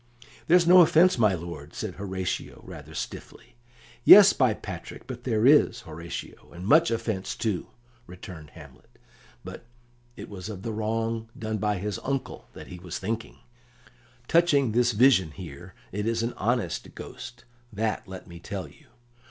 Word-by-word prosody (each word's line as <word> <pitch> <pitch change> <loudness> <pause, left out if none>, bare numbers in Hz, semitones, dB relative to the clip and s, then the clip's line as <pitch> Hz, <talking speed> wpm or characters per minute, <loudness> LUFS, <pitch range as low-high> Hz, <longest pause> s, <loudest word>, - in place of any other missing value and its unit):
"There's 175 +1 +5
no 180 +1 +8
offence, 170 -1 +5
my 105 -4 +4
lord," 85 -3 -9
said 110 -4 -4
Horatio, 95 -2 -5
rather - - -11
stiffly. - - -8 0.5
"Yes, 200 +6 +10
by 130 -2 +3
St. - - -15
Patrick, - - -8
but 125 -1 -8
there 115 -3 +1
is, 145 -3 +5
Horatio, 85 -4 -9
and 90 +2 -8
much 160 +9 +5
offence, 115 -1 -3
too," 110 -8 -2 0.4
returned 90 -3 -10
Hamlet, - - -16 0.5
but 115 - -10 0.5
it - - -9
was 95 0 -8
of 100 -3 -8
the 115 - -3
wrong 115 +1 -2
done 110 -1 -3
by 105 -1 0
his 105 +2 -4
uncle 135 0 -4 0.2
he 90 - -10
was 85 -1 -6
thinking. 115 +5 -5 0.9
"Touching 145 -7 +3
this 120 +1 +2
vision 105 -6 +4
here, 85 +2 -11 0.2
it 105 +3 -3
is 115 0 0
an 120 - -2
honest 115 -4 -2
ghost, 120 -1 -10 0.3
that 110 0 -2
let 95 -1 -9
me 85 -1 -11
tell - - -6
you. - - -20
110 Hz, 155 wpm, -26 LUFS, 95-120 Hz, 0.9 s, Yes